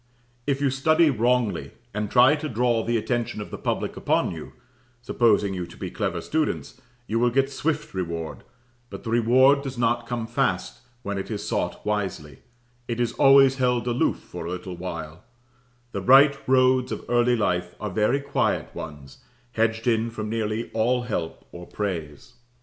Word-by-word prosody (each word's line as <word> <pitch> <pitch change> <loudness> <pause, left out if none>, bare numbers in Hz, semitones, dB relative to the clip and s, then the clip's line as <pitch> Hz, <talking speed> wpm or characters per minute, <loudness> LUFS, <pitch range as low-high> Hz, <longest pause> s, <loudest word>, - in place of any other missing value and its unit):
If 140 -1 +1
you 140 -2 +2
study 155 +4 +3
wrongly, 120 -2 0 0.2
and 105 0 -2
try 130 +5 +6
to 155 0 -5
draw 120 -1 +1
the 120 0 0
attention 120 0 -2
of 105 - -7
the - - -5
public - - -2
upon - - +1
you, - - -8 0.5
supposing 105 -5 +2
you 90 -2 -4
to - - -14
be - - -5
clever - - -2
students 155 0 -2 0.2
you 115 +1 -1
will 120 +1 +3
get 135 +3 +1
swift 150 +2 -2
reward; 85 -3 -4 0.5
but - - -9
the 115 - -4
reward 130 +4 +5
does 135 -2 -6
not 120 0 0
come 120 -2 -3
fast - - -1 0.2
when 100 -3 -3
it 95 - -6
is 105 -3 -4
sought - - -2
wisely; 95 -9 -3 0.5
it 115 0 -3
is 120 -1 0
always 135 -1 +6
held 125 -2 +1
aloof 120 0 +1
for 85 - -8
a - - -4
little 90 0 -5
while; 85 -2 -7 0.7
the - - -4
right 140 +3 +7
roads 130 -1 +3
of - - -5
early 120 0 +3
life 90 -5 -1
are 105 - -4
very 110 +8 +2
quiet 140 0 -1
ones, 70 -4 -9 0.3
hedged 115 -1 0
in 115 -1 +2
from 110 -2 -5
nearly 110 0 -2
all 120 +3 +1
help 85 -9 -4
or 85 0 -10
praise. 80 -8 -5
115 Hz, 170 wpm, -25 LUFS, 100-130 Hz, 0.7 s, right